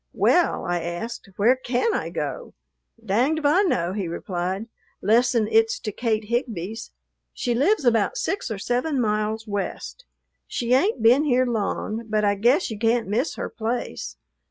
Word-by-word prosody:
"Well," - - +2
I 175 -1 -1
asked, 175 +6 -5
"where 230 +6 +4
can 255 - 0
I - - -2
go?" - - -5 0.5
"Danged 245 +10 +2
if 310 - -4
I 305 +7 +5
know," 185 - 0
he 195 -3 -2
replied, 180 +4 -3 0.3
"'lessen 230 +1 +3
it 450 0 +4
's - - -3
to 215 - -3
Kate 220 0 -1
Higbee's. 225 -2 -3 0.5
She 240 - -1
lives 290 - +2
about 235 - +2
six 400 - -2
or 220 - -3
seven 250 +7 -1
miles 215 -1 -1
west. 205 - -5 0.4
She 240 0 -1
ain't 270 - +2
been 250 +7 +5
here 255 -2 +3
long, 225 0 -2
but 215 -1 +1
I 205 - +3
guess 240 - +2
you 215 - -6
can't 230 0 +1
miss 235 +10 -1
her - - -4
place. 230 +2 -4
230 Hz, 165 wpm, -24 LUFS, 210-255 Hz, 0.5 s, I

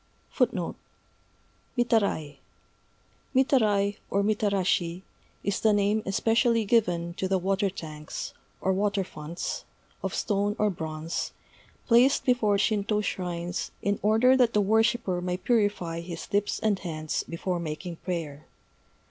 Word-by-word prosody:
_ - - +1 1.0
Mitarai. 200 - +1 1.0
Mitarai 210 -7 +3
(or 200 +1 +1
mitarashi) 195 -4 +1 0.4
is 200 0 0
the 220 -1 +4
name 205 +1 +2
especially 225 +3 +2
given 175 -6 +2
to 190 - -2
the 190 0 +2
water 195 +2 +1
tanks, 155 -5 -7 0.3
or 190 - +2
water 200 0 +1
fonts 165 0 -5 0.4
of - - -3
stone 205 0 0
or 210 -2 +2
bronze 160 -1 -4 0.5
placed 250 +4 +4
before 235 -5 +3
Shintô 210 +1 +1
shrines 175 -2 -3
in 200 0 0
order 225 +5 +5
that 245 -3 +3
the 210 - +4
worshipper 215 -2 +2
may 180 0 -1
purify 205 -6 0
his 170 +1 -7
lips 205 0 +1
and 210 -3 +1
hands 155 -3 -3
before 175 +1 -2
making 165 +1 -5
prayer. 160 -6 -5
200 Hz, 120 wpm, -27 LUFS, 175-215 Hz, 1.0 s, order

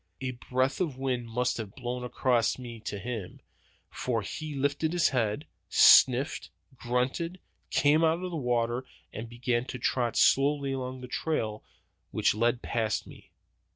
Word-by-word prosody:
A 130 -1 -3
breath 130 +4 -1
of 150 -8 -1
wind 130 -3 -2
must 125 +2 -1
have 110 -3 -6
blown 125 -1 -4
across 125 -1 +1
me 120 -3 -8
to 100 - -3
him, 105 -3 -6 0.5
for 115 -4 -2
he 155 +8 -6
lifted 145 +4 0
his 175 -1 +3
head, 120 +2 -1 0.2
sniffed, 130 +3 +6 0.3
grunted, 130 +9 -2 0.3
came 150 +3 +3
out 165 +2 +2
of 180 - -4
the - - -4
water, 120 -3 0 0.3
and 115 +1 -6
began 120 0 -1
to 130 - -6
trot 120 -1 0
slowly 140 0 +3
along 130 -1 -4
the 125 - -7
trail 115 -6 -2 0.5
which - - +2
led 120 +3 +1
past 110 -2 -1
me. - - -15
125 Hz, 155 wpm, -29 LUFS, 120-140 Hz, 0.5 s, sniffed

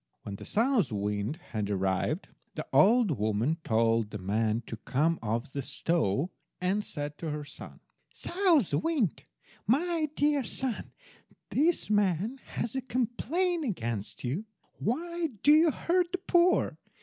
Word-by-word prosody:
When 100 -1 -6
the - - -10
South 225 - +2
wind 105 +4 -1 0.2
had 105 -2 -2
arrived, 95 - 0 0.3
the 155 - -4
old 195 - +5
woman 110 +9 +1
told 115 -1 +2
the 105 - -5
man 110 +4 0
to 115 - -6
come 155 +8 +1
off 115 +3 -2
the 140 - -3
stove, 155 - 0 0.3
and 190 +3 +1
said 145 -3 -5
to 165 - -3
her 150 0 -4
son— 145 - -11 0.3
"South 345 - +2
wind, 300 - 0 0.4
my 315 - +2
dear 290 -1 +2
son, 250 0 -3 0.6
this 310 -5 +2
man 205 +4 +1
has 230 +2 -3
a 265 - 0
complaint 270 - 0
against 115 - -3
you. 145 - -2 0.3
Why 340 - -1 0.2
do 290 - +7
you 315 +2 +7
hurt 345 +4 +1
the - - +2
poor? 360 -1 +3
180 Hz, 140 wpm, -29 LUFS, -, 0.6 s, do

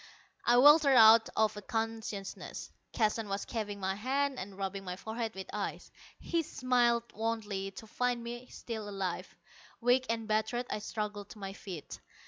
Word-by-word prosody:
I 240 - +5
weltered 290 +1 +8
out 225 0 +8
of 215 -1 +3
unconsciousness. 225 -1 -4 0.2
Keston 215 -1 0
was 195 +1 -2
chafing 210 -3 -4
my 190 0 0
hands 265 +6 0
and 195 +1 -7
rubbing 195 0 -3
my 180 -1 -4
forehead 220 +2 -4
with 190 0 -7
ice. - - -4 0.3
He 335 - 0
smiled 245 -5 +2
wanly 210 -3 -2
to 220 - -8
find 245 +2 -1
me 240 +2 -6
still 220 -3 -6
alive. 195 -3 -4 0.4
Weak 250 +2 +3
and 225 -1 -1
battered, 220 +3 0
I - - -1
struggled 210 -1 -4
to - - -11
my 195 -1 -6
feet. 180 -7 -8
220 Hz, 155 wpm, -32 LUFS, 200-240 Hz, 0.4 s, weltered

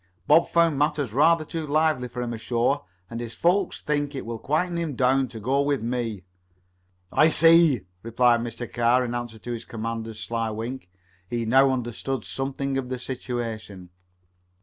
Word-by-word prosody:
"Bob 155 +7 +5
found 165 -4 +3
matters 145 -6 0
rather 155 +4 +4
too 160 0 -5
lively 155 -3 +1
for 125 0 -5
him 120 -1 -4
ashore, 120 +5 0 0.2
and 115 +2 -6
his 120 -1 -6
folks 180 +2 +1
think 145 -1 -1
it 135 - -5
will 115 0 -5
quiet 170 +7 0
him 165 -5 -2
down 130 +1 +2
to 115 -2 -9
go 130 +6 +1
with 140 -4 0
me." 115 -5 -3 0.9
"I 155 - +5
see," 165 - +5 0.2
replied 120 +2 +3
Mr. 115 +1 -5
Carr 120 +2 +3
in 120 - -4
answer 120 -2 -5
to 120 +2 -7
his 115 -1 -4
commander's 115 -1 -5
sly 115 0 -2
wink. 115 -1 -6 0.4
He 120 -1 -2
now 135 +4 +5
understood 125 0 -3
something 135 0 -2
of 125 -2 -6
the 130 - -3
situation. 115 -7 -6
125 Hz, 170 wpm, -25 LUFS, 115-145 Hz, 0.9 s, Bob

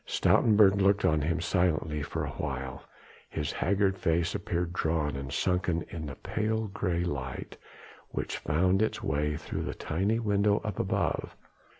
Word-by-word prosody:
Stoutenburg 100 -3 +4
looked 100 +1 +3
on 80 -1 +3
him 85 +4 0
silently 80 -4 +1
for 75 - -3
awhile, 65 0 -4 0.5
his 75 -2 -2
haggard 95 +1 +1
face 85 0 +1
appeared 90 -3 -2
drawn 80 -4 0
and 70 0 -5
sunken 90 0 0
in 80 -3 -5
the 70 - -6
pale 110 +1 -1
grey 90 -4 -1
light 65 -7 -4 0.5
which - - -3
found 90 +7 +2
its 110 - 0
way 75 +2 0
through - - -4
the - - -4
tiny 95 +8 0
window 105 -2 +2
up 105 -4 -4
above. - - -1
85 Hz, 150 wpm, -29 LUFS, 75-100 Hz, 0.5 s, Stoutenburg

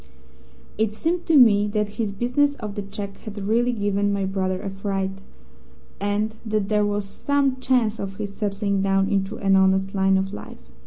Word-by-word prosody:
"It 220 -1 +2
seemed 335 +11 -2
to 325 -3 +5
me 210 -5 +6
that 210 0 -2
this 220 -4 -1
business 250 +7 +1
of 215 -6 -6
the 205 - -4
cheque 200 0 -7
had 215 -1 -9
really 225 +5 +1
given 205 -2 0
my 200 -1 0
brother 190 -1 -1
a 195 - -5
fright, 195 0 -3 0.8
and 205 +2 -1
that 215 -3 -1
there 210 -1 +2
was 205 0 -1
some 275 +6 0
chance 245 -4 +1
of 195 -1 -5
his 200 -1 -5
settling 200 -1 -1
down 195 0 +2
into 200 +1 -1
an 195 -4 +3
honest 190 0 +3
line 195 -1 +3
of 190 +1 -2
life. - - -8
205 Hz, 180 wpm, -23 LUFS, 195-220 Hz, 0.8 s, me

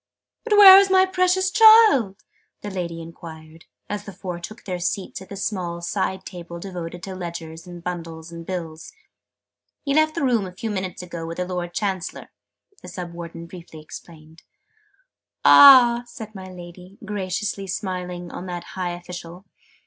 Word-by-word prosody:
"But 470 - -1
where 390 -2 +11
is 395 -1 +2
my 375 0 +5
precious 375 0 +1
child?" 430 - +6 0.4
my 205 - -5
Lady 170 -3 -5
enquired, 160 -1 -12 0.2
as 205 -1 -5
the 205 - -9
four 180 -1 -7
took 215 +7 -10
their 180 -2 -4
seats 185 +1 -3
at 190 - -13
the 200 - -7
small 185 -4 -4
side 190 +2 -3
table 170 -2 -9
devoted 175 -2 -7
to 190 - -6
ledgers 170 -2 -8
and 175 -1 -10
bundles 165 -2 -7
and 170 0 -9
bills. 165 - -7 0.9
"He 280 - -1
left 310 +1 +2
the 335 - -2
room 235 -7 +1
a - - -9
few 225 +3 -4
minutes 185 -2 -5
ago 170 -2 -7
with 165 - -7
the 180 - -2
Lord 180 -1 -5
Chancellor," 190 -4 -4 0.5
the - - -12
Sub 175 -2 -7
Warden 170 -1 -8
briefly 170 -2 -12
explained. 160 +1 -13 1.0
"Ah!" 250 -4 +8
said 220 -2 -10
my 190 -2 -9
Lady, 180 +2 -12
graciously 195 0 -4
smiling 180 -3 -5
on 185 - -8
that 175 -1 -5
high 180 -2 -3
official. 175 +1 -10
180 Hz, 165 wpm, -22 LUFS, 170-205 Hz, 1.0 s, where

